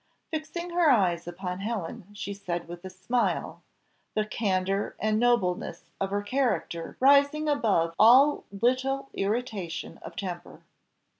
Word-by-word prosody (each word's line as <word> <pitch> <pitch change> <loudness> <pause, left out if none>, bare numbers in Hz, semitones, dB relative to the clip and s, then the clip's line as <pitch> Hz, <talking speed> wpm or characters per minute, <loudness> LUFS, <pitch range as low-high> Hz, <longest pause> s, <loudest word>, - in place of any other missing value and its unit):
Fixing 325 +3 -4
her 340 -2 +4
eyes 180 -9 +2
upon 180 +1 -5
Helen, 205 -1 -4
she 200 0 -4
said 175 -4 -4
with 175 +1 -9
a 190 - -6
smile, 215 +7 -1 0.5
the 215 0 +1
candour 195 -2 -1
and 215 0 +1
nobleness 235 -7 0
of 195 - 0
her 205 +1 -1
character 205 -9 -1
rising 285 +3 +4
above 210 - +2
all 265 +7 +6
little 260 +6 0
irritation 200 -5 -3
of 165 - -10
temper. 175 -3 -6
205 Hz, 130 wpm, -27 LUFS, 185-260 Hz, 0.5 s, all